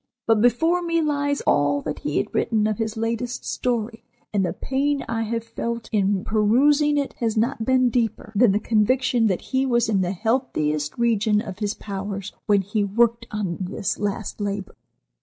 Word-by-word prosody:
But 225 -2 +3
before 325 +10 +3
me 335 -1 0
lies 285 -2 0
all 145 0 +2
that 150 -1 -4
he 150 - -2
had 130 - -1
written 215 -2 +1
of 215 0 -1
his 220 0 -2
latest 230 +2 -3
story, 230 -2 -2 0.3
and 200 -2 +2
the 180 - 0
pain 280 +1 -1
I 225 0 -1
have 230 0 -2
felt 230 0 -5
in 200 -2 +1
perusing 280 +8 +3
it 280 -1 -1
has 225 -2 -1
not 225 0 0
been 255 -1 +3
deeper 225 -2 -1
than 225 0 +5
the 205 - +1
conviction 235 +2 +2
that 185 -4 0
he 260 0 +3
was 240 -3 +1
in 200 -3 +2
the 180 +1 -1
healthiest 155 - -1
region 220 -3 +2
of 205 -3 -6
his 210 -1 -1
powers 200 0 -5
when 205 -2 +3
he 205 +2 -1
worked 230 +3 +1
on 200 -5 -3
this 190 +1 -3
last 205 +1 -3
labor. 200 -1 -3
225 Hz, 180 wpm, -23 LUFS, 200-245 Hz, 0.3 s, than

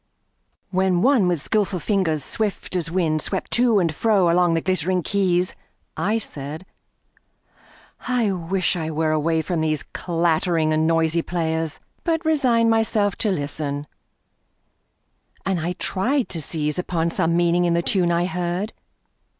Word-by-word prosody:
WHEN 185 -1 +2
one 255 -8 +4
with 170 -5 0
skillful 205 -3 +1
fingers 170 -5 0
swift 205 +2 -2
as 170 -3 -1
wind 165 -3 0
Swept 190 +3 -2
to 235 -2 +4
and 170 -5 +1
fro 195 -3 +2
along 175 -1 +3
the 165 - 0
glittering 185 0 0
keys, 185 -2 +1 0.4
I 215 +3 0
said: 155 -4 -6 1.4
I 240 -5 +1
wish 185 +1 -1
I 160 -2 -3
were 160 0 0
away 160 +1 +1
from 170 -2 -2
these 155 -2 0
Clattering 165 -2 0
and 155 +1 +2
noisy 165 0 +2
players! 160 -2 -2 0.2
but 330 -1 -1
resigned 250 -7 +3
Myself 220 -3 +1
to 215 - 0
listen, 145 -4 -3 1.6
and 190 -2 0
I 170 +3 -2
tried 240 +9 -1
to 165 - -1
seize 150 0 -2
Upon 170 -2 -1
some 165 +1 +1
meaning 175 0 +2
in 170 -1 +2
the 170 - +1
tune 180 -2 +2
I 170 +1 +1
heard. 180 +2 -2
175 Hz, 145 wpm, -22 LUFS, 160-195 Hz, 1.6 s, one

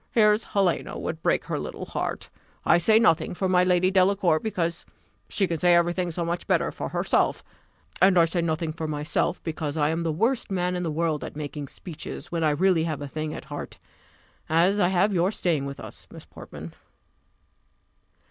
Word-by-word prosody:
Here's 210 -1 +4
Helena 195 -4 0
would 160 0 -4
break - - +1
her - - -2
little - - -6
heart; - - -4 0.3
I - - +5
say 215 +6 +4
nothing 180 -8 +3
for 190 - -1
my 180 -1 +4
Lady 180 0 +3
Delacour, 185 -3 +3
because 170 -6 -2 0.5
she 200 - +1
can 165 -3 -3
say 175 +1 +5
every 170 0 +3
thing 180 -1 -1
so 170 +1 -3
much 170 +1 -3
better - - +1
for - - -5
herself; - - 0 0.6
and 190 -1 +6
I 170 - +7
say 170 +1 -1
nothing 160 -1 -1
for 160 -1 -4
myself, 150 +4 -1
because 160 -2 -3
I 150 -1 +2
am 165 +1 -1
the 165 -1 0
worst 230 - 0
man 180 -1 -1
in 180 - -2
the 170 - -2
world 155 -1 -1
at - - -7
making 145 -1 -5
speeches, 165 +1 -8
when 170 -1 -1
I 155 - +4
really 165 +2 +2
have 155 -3 -3
a - - -5
thing 155 +2 -4
at - - -8
heart 145 -1 -7 0.7
as 175 +6 +3
I 180 - +4
have 190 +3 +2
your 180 +2 +2
staying 160 -9 0
with 140 - -7
us, - - -10
Miss - - -12
Portman." 80 +2 -10
170 Hz, 195 wpm, -25 LUFS, 155-185 Hz, 0.7 s, I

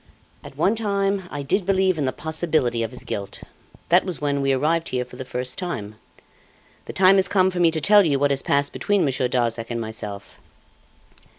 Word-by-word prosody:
"At - - -12
one 200 - +2
time 200 -3 -1
I 145 -1 -5
did 185 +8 0
believe 190 -2 +1
in 145 - 0
the 130 - 0
possibility 155 -6 -1
of 115 - -2
his 125 +1 -7
guilt. 100 -1 -6 0.5
That 175 +2 +5
was 185 -5 -4
when 145 -1 -1
we 135 0 +1
arrived 160 +5 0
here 125 -1 -2
for - - -14
the 130 - -6
first 125 0 -4
time. 115 - -5 0.9
The - - -6
time 190 +1 +5
has 190 0 +3
come 190 -1 +2
for 180 - -4
me 170 -1 +5
to 160 -1 -1
tell 205 +4 +5
you 145 -5 +1
what 140 +1 +1
has 135 -1 0
passed 140 0 +1
between 205 -4 +1
Monsieur 130 -2 0
Darzac 120 -2 -1
and 120 -1 -3
myself." 105 -3 -7
145 Hz, 205 wpm, -23 LUFS, 125-185 Hz, 0.9 s, That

